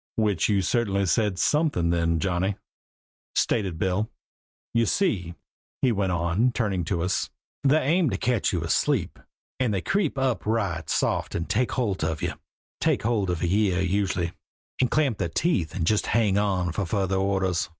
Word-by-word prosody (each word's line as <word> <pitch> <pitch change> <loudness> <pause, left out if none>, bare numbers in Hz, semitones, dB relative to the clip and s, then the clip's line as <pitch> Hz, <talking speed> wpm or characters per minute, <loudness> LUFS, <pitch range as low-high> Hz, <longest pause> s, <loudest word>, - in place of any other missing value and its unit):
"Which 105 -4 +1
you 100 -2 +2
certainly 100 -2 +1
said 105 0 +1
something 145 - +2
then, 85 -1 +1
Johnny," 95 +3 0 0.8
stated 95 -7 +1
Bill. 95 +5 0 0.6
"You 115 -1 +2
see," 95 - 0 0.5
he 130 - +4
went 100 -4 0
on, 90 +8 +1
turning 100 -7 0
to 85 0 -1
us, 90 +1 -1 0.3
"they 140 +2 +4
aim 160 +3 +2
to - - -2
catch 120 -4 +1
you - - -1
asleep - - 0 0.4
and 125 -4 +1
they 95 -3 -1
creep 195 - 0
up 130 -9 0
right 100 -8 -1
soft - - 0
and 85 - -2
take 110 +5 0
holt 105 -10 -1
of 80 -1 -2
you - - -1 0.5
take - - +1
holt 105 -4 +1
of 90 -1 -2
a - - +2
year 95 0 +2
usually 95 -2 0 0.5
and 125 - +3
clamp 140 -7 +1
their 85 - -1
teeth 85 - 0
and 85 -4 -1
just 105 +4 +1
hang 105 -3 +2
on 95 -4 +1
for 95 +1 -2
further 95 0 0
orders. 95 -4 0
100 Hz, 170 wpm, -25 LUFS, 90-115 Hz, 0.8 s, he